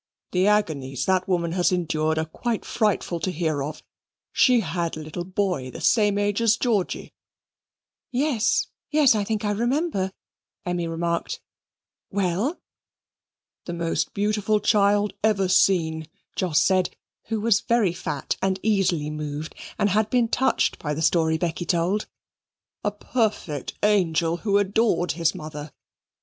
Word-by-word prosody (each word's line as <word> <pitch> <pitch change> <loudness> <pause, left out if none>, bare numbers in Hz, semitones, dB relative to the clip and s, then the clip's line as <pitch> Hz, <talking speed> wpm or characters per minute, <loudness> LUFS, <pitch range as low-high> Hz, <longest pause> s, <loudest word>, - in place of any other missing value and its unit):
"The 185 +2 +2
agonies 150 -11 0
that 185 -1 +1
woman 170 -3 0
has 180 +1 +2
endured 160 -3 0
are 160 - 0
quite 225 +8 -3
frightful 210 -6 0
to 165 - -1
hear 160 -4 -1
of. 150 +2 -5 0.5
She 250 -3 +5
had 170 -2 -2
a - - -5
little 155 +3 -5
boy, 185 -7 -1
of 130 - -10
the - - -8
same 210 -3 +3
age 205 +1 0
as 230 -1 +4
Georgy." 220 -7 -1 1.0
"Yes, 255 -3 +1 0.2
yes, 295 -5 +5
I 210 -2 0
think 215 +1 -2
I 205 - +1
remember," 235 - 0 0.5
Emmy 175 -1 -1
remarked. 170 +1 -2 0.7
"Well?" 200 - -1 1.1
"The 175 - -4
most 170 -1 -1
beautiful 210 +1 +1
child 205 0 +3
ever 205 -3 +2
seen," 160 -4 +2 0.3
Jos 175 -5 +2
said, 185 -1 +3 0.4
who 225 -1 -2
was 220 0 +3
very 230 -7 +2
fat, 145 -5 -3
and 190 0 0
easily 185 -8 +1
moved, 150 0 -5 0.2
and 205 - +2
had 215 +2 +2
been 245 -2 +2
touched 265 - +1
by 150 -1 -3
the 160 - -2
story 160 -1 +3
Becky 170 0 -2
told; 175 +5 0 0.8
"a - - +2
perfect 210 - -2
angel, 170 -5 +2
who 200 +2 +1
adored 200 -3 +2
his 165 -1 0
mother. 150 -1 -7
185 Hz, 145 wpm, -24 LUFS, 165-210 Hz, 1.1 s, She